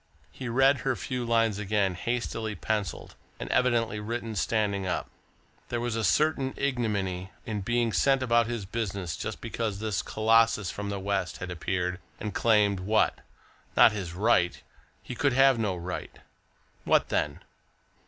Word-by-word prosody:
He 130 -2 -6
read 135 +3 +4
her 130 +2 0
few 125 0 -3
lines 115 -3 +2
again, 100 -2 +1
hastily 115 +2 -3
pencilled, 105 -7 -3 0.3
and - - -5
evidently 120 -4 +2
written 115 +1 -4
standing 100 -1 0
up. 90 - -2 0.6
There 120 - -1
was 120 -1 -2
a 115 - -1
certain 135 - +2
ignominy 100 -9 -1 0.2
in 105 -4 -3
being 120 +2 0
sent 135 -1 +3
about 120 -2 +3
his 115 -4 -3
business, 100 -5 -3
just - - -5
because 110 -4 -3
this 105 -4 -1
colossus 110 -3 +2
from 100 0 -5
the 100 -1 -3
West 95 -2 -2
had 90 0 -6
appeared 90 +1 -2 0.2
and 105 -2 -4
claimed 105 -3 +3
what? 110 +4 +1 0.6
Not - - +8
his 95 -5 -5
right! 95 -3 +2 0.4
he - - -6
could 135 +2 +1
have 135 -1 +5
no 105 -4 0
right! 90 +1 -6 0.7
What - - +3
then?... 75 -1 -1
110 Hz, 155 wpm, -28 LUFS, 95-120 Hz, 0.7 s, Not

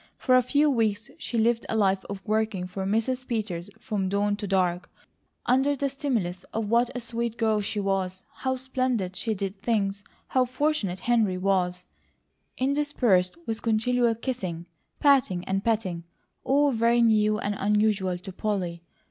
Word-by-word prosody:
For 255 - +1
a 255 - +6
few 290 +5 +2
weeks 220 -6 0
she 235 - -3
lived 230 +1 +2
a - - 0
life 195 -2 +2
of 195 -1 -7
working 215 -3 0
for 190 +1 -4
Mrs. 250 +5 0
Peters 205 -6 -3
from 200 -4 -2
dawn 205 +1 +1
to 205 -1 -5
dark, 180 -2 0 0.6
under 265 +3 +3
the 280 0 -1
stimulus 235 - -2
of 220 -1 -3
what 235 +2 +3
a - - -1
sweet 235 -1 -3
girl 220 -2 +2
she 205 +1 -2
was, 190 -2 -1
how 260 -1 -1
splendidly 255 -7 -1
she 220 +2 -2
did 195 0 -4
things, 200 -3 0 0.3
how 255 -1 +3
fortunate 255 - -1
Henry 225 -6 +2
was, 180 -1 0 0.7
interspersed 260 - +1
with 225 0 -3
continual 230 +1 +2
kissing, 190 -9 -4 0.3
patting, 265 - +3
and 195 +1 -1
petting, 195 -7 -1 0.4
all 285 +1 +3
very 235 0 +3
new 215 -2 +3
and 205 -2 -2
unusual 205 -3 +1
to 185 +1 -9
Polly. 180 -5 -2
215 Hz, 155 wpm, -26 LUFS, 190-245 Hz, 0.7 s, a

